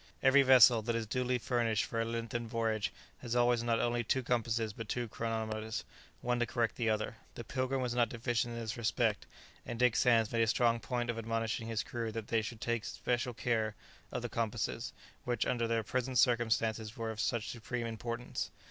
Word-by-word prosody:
Every 140 Hz, +1 st, +7 dB
vessel 125 Hz, -3 st, +7 dB
that 115 Hz, +2 st, -1 dB
is 115 Hz, -1 st, -1 dB
duly 125 Hz, +3 st, 0 dB
furnished 115 Hz, -2 st, +1 dB
for 115 Hz, -, -2 dB
a -, -, 0 dB
lengthened 115 Hz, 0 st, -3 dB
voyage 110 Hz, -2 st, 0 dB, 0.3 s
has 120 Hz, -1 st, -3 dB
always 120 Hz, -1 st, +4 dB
not 115 Hz, -1 st, +1 dB
only 120 Hz, 0 st, +1 dB
two 130 Hz, +3 st, 0 dB
compasses 115 Hz, -3 st, 0 dB
but 115 Hz, 0 st, -7 dB
two 120 Hz, -1 st, -1 dB
chronometers, 110 Hz, 0 st, -3 dB, 0.4 s
one 120 Hz, 0 st, 0 dB
to 120 Hz, -, +1 dB
correct 115 Hz, 0 st, 0 dB
the 115 Hz, -2 st, 0 dB
other. 110 Hz, +1 st, -1 dB, 0.2 s
The 120 Hz, -, -6 dB
"Pilgrim" 130 Hz, +2 st, -1 dB
was 120 Hz, -1 st, -1 dB
not 120 Hz, -1 st, +2 dB
deficient 120 Hz, 0 st, -1 dB
in -, -, -4 dB
this 115 Hz, 0 st, -4 dB
respect, 115 Hz, -2 st, 0 dB, 0.4 s
and 120 Hz, -, -5 dB
Dick 125 Hz, -1 st, +4 dB
Sands 115 Hz, -4 st, +4 dB
made 115 Hz, -, +1 dB
a 115 Hz, -, +3 dB
strong 115 Hz, +1 st, +3 dB
point 120 Hz, +2 st, -1 dB
of 115 Hz, -, -5 dB
admonishing 115 Hz, 0 st, -2 dB
his 115 Hz, -1 st, -1 dB
crew 115 Hz, -2 st, -4 dB
that 115 Hz, -1 st, -5 dB
they 115 Hz, -1 st, +2 dB
should 110 Hz, 0 st, -7 dB
take 120 Hz, -1 st, 0 dB
especial 120 Hz, +2 st, -2 dB
care 110 Hz, -2 st, 0 dB, 0.4 s
of -, -, -3 dB
the -, -, -1 dB
compasses, 115 Hz, -2 st, -2 dB, 0.3 s
which 120 Hz, -2 st, 0 dB
under 120 Hz, -2 st, 0 dB
their 115 Hz, -1 st, +1 dB
present 130 Hz, +3 st, -1 dB
circumstances 110 Hz, -2 st, +2 dB
were 115 Hz, -1 st, -2 dB
of 110 Hz, -, -8 dB
such 115 Hz, 0 st, 0 dB
supreme 120 Hz, +1 st, -4 dB
importance. 115 Hz, +2 st, -4 dB
115 Hz, 200 wpm, -33 LUFS, 110-120 Hz, 0.4 s, Every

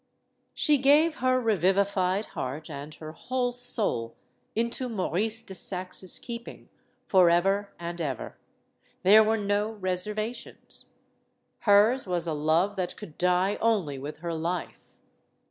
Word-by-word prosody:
She 295 Hz, -3 st, +3 dB
gave 300 Hz, +4 st, +4 dB
her 255 Hz, 0 st, +2 dB
revivified 195 Hz, -2 st, +1 dB
heart 150 Hz, +5 st, -5 dB
and 145 Hz, +1 st, -7 dB
her 155 Hz, 0 st, -9 dB
whole 245 Hz, +8 st, -2 dB
soul 215 Hz, -, 0 dB, 0.4 s
into 235 Hz, +3 st, -1 dB
Maurice 215 Hz, +2 st, -1 dB
de 195 Hz, -, -9 dB
Saxe's 185 Hz, 0 st, -2 dB
keeping, 235 Hz, 0 st, -8 dB, 0.4 s
forever 190 Hz, +2 st, +3 dB
and 170 Hz, 0 st, -5 dB
ever. 135 Hz, -7 st, -4 dB, 0.7 s
There 210 Hz, +4 st, +8 dB
were 220 Hz, +1 st, +1 dB
no 205 Hz, +1 st, -1 dB
reservations. 210 Hz, +4 st, -3 dB, 0.7 s
Hers 210 Hz, +4 st, +4 dB
was 175 Hz, -2 st, -1 dB
a 165 Hz, -, -1 dB
love 160 Hz, +7 st, +1 dB
that 180 Hz, -2 st, -3 dB
could 175 Hz, -8 st, -10 dB
die 180 Hz, +3 st, +2 dB
only 195 Hz, -12 st, +1 dB
with 150 Hz, +3 st, -8 dB
her 170 Hz, -, -2 dB
life. 170 Hz, +2 st, -4 dB
195 Hz, 125 wpm, -27 LUFS, 170-225 Hz, 0.7 s, There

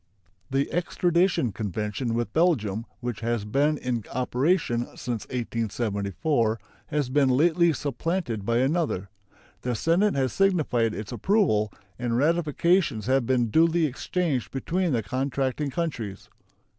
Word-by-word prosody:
The 135 Hz, +1 st, 0 dB
extradition 175 Hz, -, +1 dB
convention 105 Hz, +4 st, -3 dB
with 120 Hz, 0 st, -2 dB
Belgium, 115 Hz, -, +1 dB
which 120 Hz, -3 st, -3 dB
has 115 Hz, -2 st, -1 dB
been 145 Hz, +7 st, +2 dB
in 125 Hz, -4 st, -2 dB
operation 125 Hz, 0 st, +1 dB
since 120 Hz, -4 st, -4 dB
1874, 115 Hz, -, -1 dB, 0.3 s
has 145 Hz, -3 st, -1 dB
been 140 Hz, -1 st, +3 dB
lately 170 Hz, +6 st, +4 dB
supplanted 145 Hz, -, -2 dB
by 115 Hz, +3 st, +1 dB
another. 135 Hz, -, 0 dB, 0.5 s
The 125 Hz, -1 st, -1 dB
Senate 175 Hz, -, +2 dB
has 130 Hz, -3 st, 0 dB
signified 150 Hz, -, +2 dB
its 105 Hz, -1 st, -6 dB
approval, 140 Hz, -, +2 dB, 0.3 s
and 120 Hz, -1 st, 0 dB
ratifications 160 Hz, -, +2 dB
have 130 Hz, -1 st, +2 dB
been 120 Hz, -4 st, +2 dB
duly 165 Hz, +2 st, +4 dB
exchanged 145 Hz, -1 st, -1 dB
between 170 Hz, +6 st, -1 dB
the 115 Hz, -4 st, 0 dB
contracting 135 Hz, +4 st, -1 dB
countries. 125 Hz, -, -4 dB
130 Hz, 120 wpm, -26 LUFS, 115-165 Hz, 0.5 s, lately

